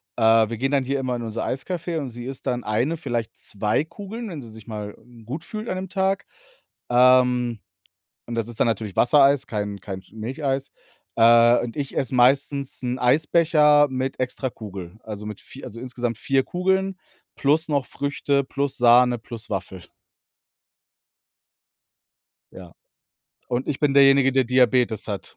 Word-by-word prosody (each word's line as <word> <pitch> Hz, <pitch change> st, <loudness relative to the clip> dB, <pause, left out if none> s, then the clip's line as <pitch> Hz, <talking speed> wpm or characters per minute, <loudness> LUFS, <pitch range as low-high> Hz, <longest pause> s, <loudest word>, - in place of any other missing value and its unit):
äh, 115 Hz, -1 st, +4 dB
wir 115 Hz, -, -4 dB
gehen 135 Hz, +4 st, -1 dB
dann 140 Hz, -2 st, +2 dB
hier 135 Hz, +1 st, -1 dB
immer 130 Hz, -2 st, -2 dB
in 120 Hz, -, -5 dB
unser 115 Hz, 0 st, -4 dB
Eiscafé 170 Hz, +5 st, -3 dB
und 140 Hz, -, -5 dB
sie 120 Hz, 0 st, -9 dB
isst 135 Hz, 0 st, -7 dB
dann 125 Hz, -1 st, -1 dB
1, 120 Hz, +10 st, 0 dB
vielleicht 120 Hz, -7 st, -4 dB
2 105 Hz, +6 st, -1 dB
Kugeln, 210 Hz, +7 st, -8 dB
wenn 160 Hz, -6 st, -7 dB
sie 115 Hz, -, -11 dB
sich 110 Hz, 0 st, -13 dB
mal, 105 Hz, -2 st, -6 dB
hm, 120 Hz, -2 st, -18 dB
gut 145 Hz, +8 st, -6 dB
fühlt 215 Hz, +4 st, -7 dB
an -, -, -2 dB
dem 185 Hz, 0 st, -5 dB
Tag. 195 Hz, 0 st, 0 dB, 0.7 s
Ähm, 125 Hz, -1 st, +4 dB, 0.7 s
und 120 Hz, -, -5 dB
das 115 Hz, -1 st, -2 dB
ist 120 Hz, -1 st, -10 dB
dann -, -, +4 dB
natürlich 110 Hz, -3 st, -3 dB
Wassereis, 140 Hz, +1 st, +4 dB
kein 105 Hz, -2 st, -4 dB
kein 95 Hz, -1 st, -7 dB
Sch 90 Hz, -, -26 dB
Milcheis. 135 Hz, +5 st, -3 dB, 0.5 s
Äh, 115 Hz, +1 st, +6 dB
und 120 Hz, +2 st, -6 dB
ich 140 Hz, -2 st, -4 dB
esse 130 Hz, -1 st, -1 dB
meistens 135 Hz, +2 st, +2 dB
'n 125 Hz, 0 st, -2 dB
Eisbecher 150 Hz, +2 st, +4 dB
mit 130 Hz, 0 st, -3 dB
extra 130 Hz, +1 st, -2 dB
Kugel. 100 Hz, -4 st, -9 dB
Also 105 Hz, -1 st, -7 dB
mit 105 Hz, -2 st, -7 dB
4 -, -, -12 dB
also, 115 Hz, -, -9 dB
insgesamt 120 Hz, -2 st, -4 dB
4 135 Hz, -1 st, +1 dB
Kugeln 190 Hz, +1 st, 0 dB, 0.4 s
plus 155 Hz, +4 st, +1 dB
noch 140 Hz, -3 st, 0 dB
Früchte 140 Hz, 0 st, -1 dB
plus 140 Hz, +1 st, -3 dB
Sahne 120 Hz, 0 st, +5 dB
plus 115 Hz, 0 st, -10 dB
Waffel. 95 Hz, -2 st, -5 dB, 2.7 s
Ja, 90 Hz, -2 st, -12 dB, 0.8 s
und 125 Hz, +2 st, -2 dB
ich 145 Hz, -, -2 dB
bin 145 Hz, -2 st, +2 dB
derjenige, 135 Hz, -1 st, +6 dB
der 130 Hz, 0 st, +3 dB
Diabetes 125 Hz, -3 st, +2 dB
hat. 100 Hz, -2 st, -6 dB
125 Hz, 165 wpm, -23 LUFS, 115-140 Hz, 2.7 s, Äh